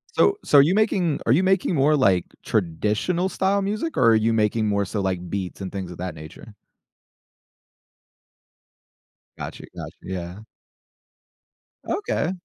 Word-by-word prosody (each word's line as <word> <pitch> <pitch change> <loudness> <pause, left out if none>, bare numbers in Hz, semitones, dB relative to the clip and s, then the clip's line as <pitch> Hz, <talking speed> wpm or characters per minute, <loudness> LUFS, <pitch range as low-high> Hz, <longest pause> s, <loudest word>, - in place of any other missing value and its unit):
So 405 0 +4
so 145 - +4
are - - +10
you 160 +7 +3
making 190 -8 +1
are - - +2
you 160 +9 +4
making 190 -1 +2
more, 145 +2 +4
like, 95 - +3 0.2
traditional-style 170 - 0
music, 215 +11 -3
or 125 - +4
are - - +5
you 110 +1 +2
making 110 0 +1
more 100 -1 +1
so, 100 +1 -3
like, 90 -2 -2
beats 95 -1 -4
and 95 - -5
things 95 -3 -5
of 90 - -9
that 90 -2 -5
nature? 80 +7 -12 2.8
Gotcha, - - -7
gotcha. - - -8
Yeah. 90 0 -6 1.5
Okay. 405 - -1
110 Hz, 140 wpm, -23 LUFS, -, 2.8 s, are